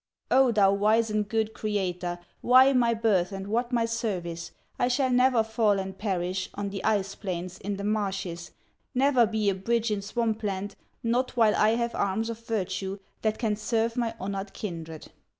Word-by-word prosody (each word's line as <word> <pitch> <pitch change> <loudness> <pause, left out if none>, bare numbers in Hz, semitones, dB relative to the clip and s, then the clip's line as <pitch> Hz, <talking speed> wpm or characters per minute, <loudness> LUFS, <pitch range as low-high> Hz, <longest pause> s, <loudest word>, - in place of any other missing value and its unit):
"O, 260 -1 +5
thou 200 -3 +4
wise 215 +2 +2
and 210 -1 -1
good 220 -1 0
Creator, 180 -4 -2 0.2
Why 260 +2 +6
my 235 -2 +3
birth 210 -5 +2
and 195 0 -5
what 235 +4 -1
my 235 -2 +2
service? 180 -8 -3 0.3
I - - +3
shall 260 +1 +1
never 250 -2 +4
fall 220 -2 +2
and 190 0 -5
perish 185 -2 -2
On 205 0 -3
the 195 -1 -5
ice 200 -3 +1
plains, 185 -2 -5
in 200 +1 -3
the 200 - -5
marshes, 195 -5 -2 0.5
Never 260 -3 +4
be 215 -1 -1
a - - -1
bridge 230 +4 0
in 205 -1 -1
swamp 220 +1 -1
land, 200 -1 -3 0.3
Not 245 +2 0
while 220 -3 +5
I 215 +2 +4
have 235 0 -1
arms 220 +4 -1
of 230 - -7
virtue 195 -4 -3 0.2
That 215 -1 0
can 220 -4 0
serve 225 +2 0
my 235 -2 -1
honored 195 +1 -4
kindred!" 165 -5 -7
215 Hz, 180 wpm, -27 LUFS, 195-230 Hz, 0.5 s, Why